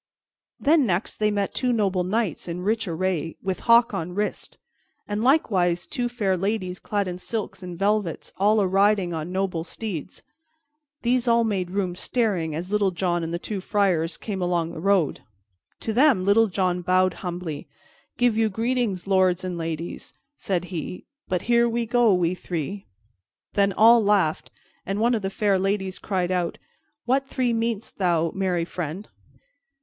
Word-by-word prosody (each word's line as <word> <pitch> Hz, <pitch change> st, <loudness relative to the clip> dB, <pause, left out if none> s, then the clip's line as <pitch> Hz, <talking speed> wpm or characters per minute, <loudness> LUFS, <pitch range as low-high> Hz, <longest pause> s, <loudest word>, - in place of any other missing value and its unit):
Then 290 Hz, -2 st, +4 dB
next 185 Hz, +2 st, -1 dB
they 215 Hz, 0 st, +2 dB
met 200 Hz, -1 st, -1 dB
two 250 Hz, -1 st, 0 dB
noble 195 Hz, -5 st, +1 dB
knights 195 Hz, -3 st, -1 dB
in 175 Hz, +1 st, -4 dB
rich 220 Hz, +1 st, 0 dB
array, 170 Hz, -1 st, -2 dB
with 190 Hz, -1 st, -2 dB
hawk 235 Hz, +1 st, +6 dB
on 170 Hz, +2 st, -4 dB
wrist, 210 Hz, +1 st, -3 dB, 0.5 s
and 205 Hz, +1 st, -2 dB
likewise 185 Hz, -, +2 dB
two 245 Hz, -1 st, -2 dB
fair 210 Hz, -6 st, 0 dB
ladies 185 Hz, -1 st, -2 dB
clad 205 Hz, -2 st, -1 dB
in 180 Hz, 0 st, -5 dB
silks 195 Hz, -2 st, -4 dB
and 180 Hz, -2 st, -7 dB
velvets, 200 Hz, -3 st, -1 dB
all 210 Hz, +3 st, +3 dB
a 200 Hz, -, +3 dB
riding 195 Hz, -1 st, +2 dB
on 160 Hz, +2 st, -4 dB
noble 185 Hz, -3 st, -1 dB
steeds. 185 Hz, -3 st, -6 dB, 0.8 s
These 245 Hz, +1 st, +1 dB
all 235 Hz, 0 st, +4 dB
made 195 Hz, -5 st, -1 dB
room, 190 Hz, -1 st, -1 dB
staring, 180 Hz, -6 st, -1 dB
as 175 Hz, +4 st, -5 dB
Little 210 Hz, -2 st, +2 dB
John 175 Hz, -1 st, -1 dB
and 165 Hz, -, -3 dB
the 170 Hz, -, -1 dB
two 195 Hz, +2 st, -5 dB
friars 185 Hz, -5 st, +1 dB
came 195 Hz, -4 st, -5 dB
along 175 Hz, -2 st, 0 dB
the 170 Hz, -, -7 dB
road. 190 Hz, -3 st, +1 dB, 0.6 s
To 220 Hz, -, -2 dB
them 250 Hz, -6 st, +4 dB
Little 220 Hz, +3 st, +5 dB
John 180 Hz, -2 st, 0 dB
bowed 185 Hz, +1 st, +2 dB
humbly. 175 Hz, -5 st, -5 dB, 0.5 s
"Give 245 Hz, -2 st, +3 dB
you 220 Hz, 0 st, +2 dB
greetings, 225 Hz, -3 st, -1 dB
lords 185 Hz, -2 st, +2 dB
and 180 Hz, -1 st, -3 dB
ladies," 165 Hz, 0 st, -5 dB, 0.2 s
said 180 Hz, -8 st, -2 dB
he. 170 Hz, +2 st, -5 dB, 0.2 s
"But 180 Hz, -1 st, -1 dB
here 235 Hz, 0 st, +3 dB
we 235 Hz, 0 st, -1 dB
go, 240 Hz, -1 st, +3 dB
we 180 Hz, -2 st, +2 dB
three." 180 Hz, +2 st, -5 dB, 0.7 s
Then 200 Hz, -1 st, +3 dB
all 225 Hz, +3 st, +6 dB
laughed, 195 Hz, -7 st, +1 dB, 0.3 s
and 195 Hz, +2 st, -3 dB
one 235 Hz, +2 st, +3 dB
of 225 Hz, -, 0 dB
the 195 Hz, -, -2 dB
fair 200 Hz, -1 st, +1 dB
ladies 195 Hz, -1 st, -1 dB
cried 185 Hz, -3 st, -1 dB
out, 180 Hz, -2 st, -1 dB, 0.5 s
"What 270 Hz, +2 st, +1 dB
three 255 Hz, -3 st, 0 dB
meanest 230 Hz, -2 st, -2 dB
thou, 170 Hz, -3 st, +2 dB
merry 185 Hz, -3 st, 0 dB
friend?" 175 Hz, +3 st, -5 dB
195 Hz, 165 wpm, -24 LUFS, 180-220 Hz, 0.8 s, hawk